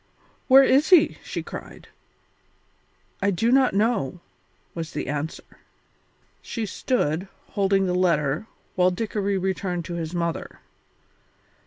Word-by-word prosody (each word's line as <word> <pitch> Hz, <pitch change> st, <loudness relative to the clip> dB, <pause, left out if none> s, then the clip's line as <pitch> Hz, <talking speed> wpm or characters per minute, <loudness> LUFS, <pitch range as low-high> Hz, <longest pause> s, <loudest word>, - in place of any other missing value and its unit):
"Where 270 Hz, +1 st, +8 dB
is 270 Hz, +3 st, +3 dB
he?" 335 Hz, -4 st, +5 dB
she -, -, -5 dB
cried. -, -, -9 dB, 1.3 s
"I 200 Hz, -, +2 dB
do 225 Hz, +5 st, +1 dB
not 260 Hz, -5 st, +4 dB
know," 200 Hz, -, 0 dB, 0.5 s
was 165 Hz, -2 st, -6 dB
the 145 Hz, -, -3 dB
answer. 150 Hz, +4 st, -5 dB, 0.8 s
She 230 Hz, -2 st, -4 dB
stood, 185 Hz, -, -1 dB, 0.2 s
holding 195 Hz, -1 st, +1 dB
the 180 Hz, -, 0 dB
letter, 170 Hz, -1 st, +1 dB, 0.3 s
while 180 Hz, 0 st, +3 dB
Dickory 200 Hz, 0 st, -2 dB
returned 185 Hz, -2 st, -2 dB
to 175 Hz, -, -6 dB
his 170 Hz, 0 st, -4 dB
mother. 170 Hz, -1 st, -3 dB
190 Hz, 120 wpm, -24 LUFS, 170-220 Hz, 1.3 s, Where